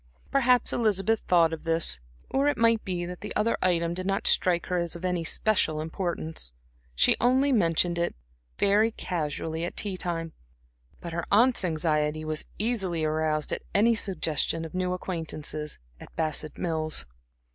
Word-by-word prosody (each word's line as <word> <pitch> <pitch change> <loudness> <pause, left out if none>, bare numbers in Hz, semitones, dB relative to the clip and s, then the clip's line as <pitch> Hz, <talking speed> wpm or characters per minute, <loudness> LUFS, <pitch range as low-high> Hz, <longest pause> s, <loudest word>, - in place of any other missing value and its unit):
Perhaps 250 -2 +3
Elizabeth 215 -1 +2
thought 170 -2 +4
of 160 - -6
this; 165 - +3 0.3
or 275 +2 +2
it 290 - +1
might 230 -1 +3
be 175 -2 -3
that 180 0 -8
the 210 - -6
other 225 +2 +2
item 170 -2 +1
did 185 +2 -4
not 195 0 -1
strike 175 -2 +3
her 180 -1 -1
as 170 0 -1
of 170 +2 -6
any 180 -2 0
special 165 -4 +1
importance. 160 - -3 0.4
She - - +5
only 260 +3 +3
mentioned 170 -5 +2
it 170 - -1 0.4
very 210 +3 +3
casually 160 -5 -3
at 175 - -5
tea 200 -3 -2
time; 165 -2 -3 0.7
but 170 -1 -6
her 170 0 -3
aunts' 235 +3 +5
anxiety 155 -2 0
was 155 0 -2
easily 195 -7 0
aroused 155 0 0
at - - -2
any 225 +4 +5
suggestion 165 -6 -1
of 160 - -9
new 180 0 -1
acquaintances 155 -4 -4 0.2
at - - -13
Bassett 155 -1 -1
Mills. 155 - -1
175 Hz, 160 wpm, -27 LUFS, 160-200 Hz, 0.7 s, She